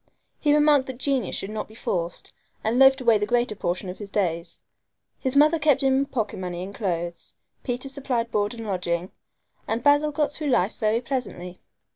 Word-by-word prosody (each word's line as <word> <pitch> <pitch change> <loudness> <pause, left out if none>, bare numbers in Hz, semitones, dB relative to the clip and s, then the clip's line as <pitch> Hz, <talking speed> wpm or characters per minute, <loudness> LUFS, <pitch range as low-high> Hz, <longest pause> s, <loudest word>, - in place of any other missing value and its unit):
He 295 - +2
remarked 295 -2 +4
that 260 -2 -6
genius 270 -4 -1
should 195 - -4
not 215 - -4
be 220 - -16
forced, 170 -5 -3 0.3
and 230 +3 +1
loafed 270 0 +6
away 230 -4 +4
the 205 - -1
greater 240 -2 +1
portion 185 0 -2
of 180 - -7
his 205 -2 -7
days. 170 -4 -2 0.6
His 260 +1 -2
mother 305 +3 +5
kept 295 -2 +3
him 265 -1 +4
in 275 +1 +2
pocket 220 -8 -3
money 180 -1 -4
and 195 +2 -7
clothes, 175 -5 -4 0.3
Peter 250 +1 -3
supplied 255 -4 -2
board 205 +2 0
and 225 -1 -7
lodging, 180 -2 -2 0.6
and 225 +2 -1
Basil 290 +1 +4
got 295 0 0
through 300 0 -5
life 205 -5 +2
very 220 +1 +1
pleasantly. 230 -9 -5
230 Hz, 190 wpm, -25 LUFS, 190-270 Hz, 0.6 s, loafed